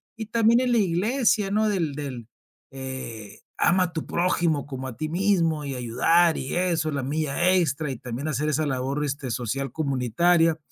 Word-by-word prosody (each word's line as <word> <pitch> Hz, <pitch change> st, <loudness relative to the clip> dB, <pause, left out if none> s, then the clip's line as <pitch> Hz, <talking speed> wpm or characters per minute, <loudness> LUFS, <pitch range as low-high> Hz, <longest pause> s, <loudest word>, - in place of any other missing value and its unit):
y 220 Hz, -1 st, -6 dB
también 230 Hz, +2 st, +3 dB
en 255 Hz, -1 st, 0 dB
la 240 Hz, -, +3 dB
iglesia, 210 Hz, +2 st, +1 dB
¿no?, 215 Hz, +1 st, +2 dB
del 170 Hz, -9 st, -1 dB
del, 130 Hz, -6 st, -6 dB, 0.4 s
eh: 130 Hz, -6 st, -7 dB, 0.2 s
"Ama 185 Hz, +1 st, +3 dB
a 175 Hz, -2 st, -4 dB
tu 160 Hz, -, -4 dB
prójimo 170 Hz, -4 st, 0 dB
como 130 Hz, -2 st, -6 dB
a 125 Hz, -, -7 dB
ti 155 Hz, -, -2 dB
mismo, 170 Hz, -4 st, +1 dB
y 135 Hz, -1 st, -4 dB
ayudar 160 Hz, +8 st, +2 dB
y 130 Hz, -, -4 dB
eso". 170 Hz, -3 st, 0 dB
La 140 Hz, -2 st, -2 dB
mía 155 Hz, +5 st, +1 dB
extra 155 Hz, -4 st, 0 dB
y 130 Hz, -, -5 dB
también 125 Hz, +3 st, -5 dB
hacer 150 Hz, +1 st, -1 dB
esa 155 Hz, +1 st, 0 dB
labor 135 Hz, +1 st, -2 dB
este 140 Hz, -2 st, -4 dB
social 125 Hz, +3 st, -3 dB
comunitaria. 160 Hz, +4 st, +2 dB
155 Hz, 180 wpm, -25 LUFS, 135-180 Hz, 0.4 s, también